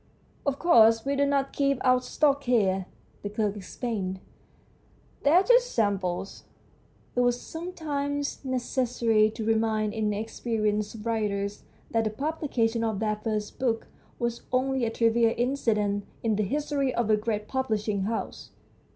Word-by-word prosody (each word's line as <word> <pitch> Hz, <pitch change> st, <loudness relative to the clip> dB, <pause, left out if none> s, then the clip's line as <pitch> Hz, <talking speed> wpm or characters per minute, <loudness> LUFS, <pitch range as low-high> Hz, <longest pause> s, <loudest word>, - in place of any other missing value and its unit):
" -, -, -34 dB
Of 280 Hz, -1 st, +1 dB
course, 225 Hz, -9 st, +5 dB
we 280 Hz, +1 st, 0 dB
do 280 Hz, 0 st, +2 dB
not 275 Hz, -1 st, 0 dB
keep 275 Hz, -1 st, +1 dB
our 255 Hz, 0 st, +5 dB
stock 280 Hz, +1 st, +1 dB
here," 195 Hz, -6 st, +2 dB, 0.3 s
the 205 Hz, -, -4 dB
clerk 210 Hz, -1 st, -1 dB
explained. 195 Hz, -2 st, -4 dB, 0.5 s
" -, -, -34 dB
These 285 Hz, -, +4 dB
are 360 Hz, +4 st, +6 dB
just -, -, +4 dB
samples." 195 Hz, -4 st, -1 dB, 0.7 s
It -, -, +1 dB
was 245 Hz, 0 st, +2 dB
sometimes 290 Hz, -5 st, -4 dB
necessary 245 Hz, -4 st, +1 dB
to 220 Hz, 0 st, -6 dB
remind 220 Hz, -1 st, +1 dB
inexperienced 215 Hz, 0 st, -2 dB
writers 205 Hz, -3 st, -2 dB, 0.3 s
that 225 Hz, -1 st, +1 dB
the -, -, +1 dB
publication 240 Hz, -3 st, -1 dB
of 220 Hz, -3 st, 0 dB
their 215 Hz, 0 st, 0 dB
first 215 Hz, -1 st, -3 dB
book 235 Hz, -3 st, -1 dB, 0.3 s
was 235 Hz, -1 st, -2 dB
only 260 Hz, 0 st, +1 dB
a -, -, 0 dB
trivial 230 Hz, 0 st, +2 dB
incident 215 Hz, -5 st, 0 dB, 0.2 s
in 225 Hz, -2 st, +2 dB
the 210 Hz, -, 0 dB
history 280 Hz, +4 st, 0 dB
of 230 Hz, -2 st, +1 dB
a -, -, +6 dB
great 210 Hz, 0 st, -2 dB
publishing 215 Hz, -6 st, -1 dB
house. 225 Hz, +2 st, -4 dB
225 Hz, 145 wpm, -27 LUFS, 210-265 Hz, 0.7 s, are